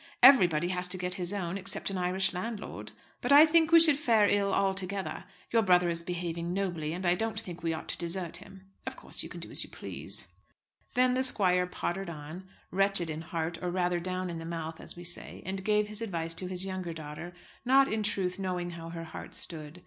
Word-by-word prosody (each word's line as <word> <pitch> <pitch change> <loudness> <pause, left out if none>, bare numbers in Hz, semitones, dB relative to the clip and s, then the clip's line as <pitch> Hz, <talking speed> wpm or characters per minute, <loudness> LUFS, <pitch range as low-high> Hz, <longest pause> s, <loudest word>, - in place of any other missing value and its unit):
Everybody 175 - +7
has 180 0 0
to 185 +1 0
get 180 0 -2
his 180 -1 -2
own, 190 -2 -3
except 195 +1 -1
an 195 - -3
Irish 185 +1 +2
landlord. 210 +4 -5 0.3
But - - 0
I 290 +2 +10
think 325 0 +4
we 335 - +9
should 310 -4 +7
fare 225 -8 +4
ill 200 -1 +2
all 195 0 +2
together. 195 0 -3 0.3
Your 230 - +4
brother 180 -3 +4
is 170 0 0
behaving 170 0 -3
nobly, 175 -6 -2
and 180 +3 -4
I 175 - +4
don't 220 +3 -2
think 175 -6 -7
we 165 - -1
ought 160 - -5
to - - 0
desert 170 0 -2
him. 190 0 -14 0.2
Of - - -4
course - - -4
you - - -6
can - - -8
do - - -7
as - - +4
you - - -10
please." - - -3 0.7
Then 250 0 +4
the 260 +1 +1
squire 180 -7 +3
pottered 180 +1 -3
on, 165 +4 -9 0.2
wretched 195 -3 +2
in 155 +1 -5
heart; 165 0 -3
or, 180 - -2
rather, 175 -1 0
down 185 0 -3
in 165 - -5
the - - -7
mouth, 165 -1 -5
as - - -4
we 175 - -9
say, 175 0 -3
and 190 +1 -4
gave 210 +1 +2
his 210 +1 -3
advice 165 -7 -2
to 180 +2 -3
his 185 0 0
younger 185 -3 -4
daughter, 155 +2 -7 0.3
not, 270 +2 +5
in 220 -3 -1
truth, 195 -2 -1
knowing 180 -2 -2
how 165 -1 -8
her 165 0 -6
heart 160 - -9
stood. 155 0 -5
180 Hz, 225 wpm, -30 LUFS, 170-200 Hz, 0.7 s, I